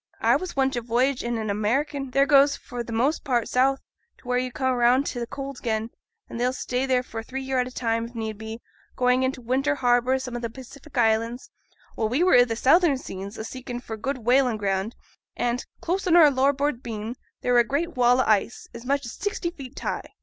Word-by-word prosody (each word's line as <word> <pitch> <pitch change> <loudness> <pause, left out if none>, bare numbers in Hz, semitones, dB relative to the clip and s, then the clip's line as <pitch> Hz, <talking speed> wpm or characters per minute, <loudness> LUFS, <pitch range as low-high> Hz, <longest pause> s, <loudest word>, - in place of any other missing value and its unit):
I - - +4
was 370 -1 -3
once 270 -1 +1
a 240 - -1
voyage 245 +3 +1
i' - - -3
an 225 -3 -2
American. 270 +7 -1
They 275 +2 +3
goes 280 -1 +5
for 245 -3 -6
th' 235 - -13
most 245 +7 0
part 245 -5 0
south, 270 +2 +2 0.4
to - - -18
where 250 0 +1
you 255 0 -3
come 260 0 0
round 250 +3 +3
to 245 - -3
t' 235 - -2
cold 275 -1 -6
again; 220 0 -2 0.4
and 230 - -7
they'll 250 +1 +1
stay 255 0 -2
there 255 -1 +2
for 225 -2 -6
three 265 +4 -6
year 265 -1 0
at 250 - 0
a - - -8
time, 230 -2 -1
if 235 +1 -11
need 220 -1 -3
be, 220 +1 -7 0.3
going 250 0 +3
into 260 0 -1
winter 270 +5 0
harbour 245 -1 +2
i' - - +3
some 255 -2 -6
o' - - -2
th' 235 -2 -4
Pacific 270 +4 -12
Islands. 230 +1 +1 0.4
Well, 220 -1 0
we 265 +9 +1
were 365 - +4
i' 245 0 +7
th' 225 -2 -3
southern 300 +3 +4
seas, 195 -3 -7
a - - -5
seeking 245 +1 -6
for 230 -2 -7
good 260 +6 -3
whaling 250 -2 +3
ground; 195 +1 -2 0.4
and, 240 +1 -1 0.2
close 375 +3 -1
on 340 - +4
our 315 -4 +8
larboard 275 0 +1
beam, 225 0 -5 0.3
there 245 - +1
were 240 - +6
a - - +6
great 300 +7 -2
wall 250 0 +4
o' - - 0
ice, 215 +2 +1
as 235 - -9
much 280 +1 0
as 230 - -6
sixty 380 -3 -3
feet 275 -5 -11
high. - - -5
250 Hz, 235 wpm, -25 LUFS, 235-275 Hz, 0.4 s, our